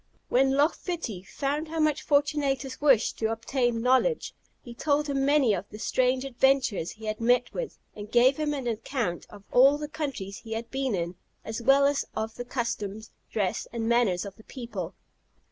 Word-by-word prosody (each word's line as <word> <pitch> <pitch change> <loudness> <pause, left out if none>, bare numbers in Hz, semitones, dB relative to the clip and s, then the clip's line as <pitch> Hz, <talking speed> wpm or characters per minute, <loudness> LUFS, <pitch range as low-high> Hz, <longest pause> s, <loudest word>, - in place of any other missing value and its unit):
When 265 +2 +3
Loch 295 +4 +4
Fitty 315 - -5
found 285 - -3
how 325 +1 -4
much 310 -1 +2
Fortunatus 285 -3 0
wished 270 -7 +3
to 220 0 0
obtain 230 0 -1
knowledge, 260 - +2 0.3
he 240 - -9
told 290 +4 +1
him 275 -1 0
many 280 -5 +4
of 195 +1 -4
the 210 - -9
strange 255 +3 +1
adventures 260 -8 +2
he 220 0 -10
had 215 +1 -3
met 245 +1 +2
with, - - -4 0.2
and 205 0 -8
gave 250 +3 +5
him 305 -1 0
an 270 -3 -4
account 230 -5 -2
of 205 -1 -13
all 270 +4 +6
the 300 0 -5
countries 275 -11 -5
he 225 -1 -7
had 230 +1 -5
been 265 -4 -1
in, 170 0 -2 0.3
as 220 +2 -4
well 275 +3 +5
as 280 0 +2
of 220 0 -3
the 245 - -7
customs, 220 -4 -4 0.2
dress, 195 -4 -1
and 230 -1 -3
manners 230 -6 +2
of 195 -1 -8
the 220 - -16
people. 220 -10 -6
245 Hz, 185 wpm, -27 LUFS, 220-280 Hz, 0.3 s, all